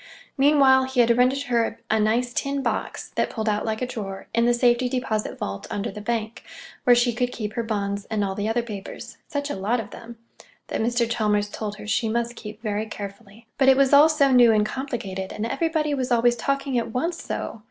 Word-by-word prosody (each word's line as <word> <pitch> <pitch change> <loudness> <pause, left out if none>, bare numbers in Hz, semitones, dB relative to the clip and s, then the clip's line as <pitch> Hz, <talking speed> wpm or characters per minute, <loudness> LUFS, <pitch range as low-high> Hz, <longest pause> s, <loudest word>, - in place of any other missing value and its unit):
Meanwhile, 270 -2 +5
he 260 -1 -2
had 235 0 +4
rented 255 +3 +2
her 235 -3 0
a 220 - +3
nice 235 +3 +1
tin 275 +1 -1
box - - -3
(that - - -1
pulled 220 -1 -4
out 210 0 0
like 220 +2 -2
a - - +1
drawer) 200 -6 -6
in 235 +1 +3
the 240 - +4
safety 240 +1 +3
deposit 245 -4 -2
vault 100 0 -5
under 200 - -3
the 210 - -8
bank, 225 0 -3 0.4
where 245 - +7
she 240 0 +2
could 245 +2 -1
keep 215 -3 -5
her 235 - -1
bonds 200 -3 -2
and 215 -2 -1
all 195 -1 -1
the 205 +2 -2
other 235 +1 0
papers—such 240 +6 -6
a - - -3
lot 210 +6 0
of 210 -2 -7
them!—that 230 -1 -9
Mr. 235 +1 +1
Chalmers 210 -3 0
told 210 0 -5
her 210 - -10
she 220 +1 0
must 235 +1 -1
keep 210 -1 -10
very 210 0 -2
carefully. 200 +1 -9
But 265 -1 +6
it 265 - +6
was 275 0 +3
all 295 +3 +8
so 285 -3 +3
new 245 -2 +7
and 210 -1 +3
complicated, 215 -6 -4
and 215 - -4
everybody 305 +3 0
was 260 -2 -2
always 240 0 +4
talking 275 0 -1
at 230 - -4
once, 330 +9 -2
so! 230 - -5
235 Hz, 215 wpm, -24 LUFS, 215-255 Hz, 0.4 s, all